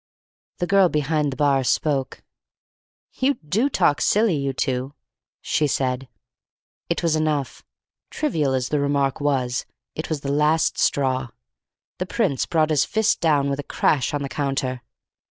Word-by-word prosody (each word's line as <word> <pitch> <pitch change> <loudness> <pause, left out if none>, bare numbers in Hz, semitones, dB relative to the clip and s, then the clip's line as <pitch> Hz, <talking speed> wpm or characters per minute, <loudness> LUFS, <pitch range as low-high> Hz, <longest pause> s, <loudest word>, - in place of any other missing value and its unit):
The 175 - -1
girl 190 0 +4
behind 150 -1 0
the - - -5
bar 140 -2 +2
spoke. 135 +1 -1 0.9
"You 275 +2 +1
do 215 - 0
talk 145 - +2
silly, 210 -4 +3
you 140 -1 -1
two!" 130 +1 -2 0.5
she 150 - +1
said. 130 -1 -1 0.8
It - - -1
was 165 -2 +2
enough. 155 -3 -1 0.5
Trivial 155 - 0
as 130 -1 -1
the 150 - +1
remark 140 -1 0
was, 130 -4 0 0.3
it 155 - -5
was 155 -3 -2
the 140 - -3
last 150 +2 +2
straw. 130 -2 +1 0.7
The 185 - -2
Prince 185 - 0
brought 160 -2 +1
his 150 -3 +3
fist 220 -1 +1
down 145 -4 +2
with 140 0 -2
a - - -3
crash 140 -1 +1
on 145 -1 -2
the - - -3
counter. 135 -3 -2
145 Hz, 155 wpm, -23 LUFS, 135-160 Hz, 0.9 s, girl